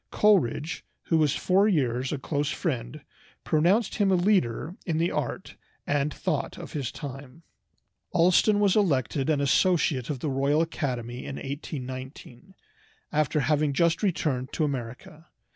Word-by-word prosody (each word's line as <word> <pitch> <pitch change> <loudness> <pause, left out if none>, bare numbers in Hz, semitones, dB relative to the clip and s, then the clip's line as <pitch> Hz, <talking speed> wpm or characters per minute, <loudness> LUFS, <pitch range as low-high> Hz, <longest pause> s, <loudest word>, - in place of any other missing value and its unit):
Coleridge, 170 - +2 0.2
who 165 - +1
was 150 -4 +2
for 195 +3 +3
years 130 - 0
a 150 - -1
close 145 +2 -2
friend, 135 -4 -3 0.4
pronounced 185 +8 +2
him 200 -2 +3
a - - +5
leader 175 - +1
in 165 -3 -1
the 170 +2 +1
art - - -4 0.3
and 145 +1 0
thought - - -3
of - - -9
his 140 -5 -3
time. 140 +2 -9 0.7
Allston 185 +5 +4
was 200 -2 +3
elected 140 - +1
an 150 -2 +2
associate 140 -2 +2
of 145 - -2
the 150 - -2
Royal 140 +4 +2
Academy 125 -7 -4
in 135 - -6
1819, 130 +2 -7 0.6
after 150 0 +1
having 150 0 +1
just 170 +3 +2
returned 150 - -1
to 160 - 0
America. 140 +4 -5
150 Hz, 145 wpm, -26 LUFS, 130-170 Hz, 0.7 s, a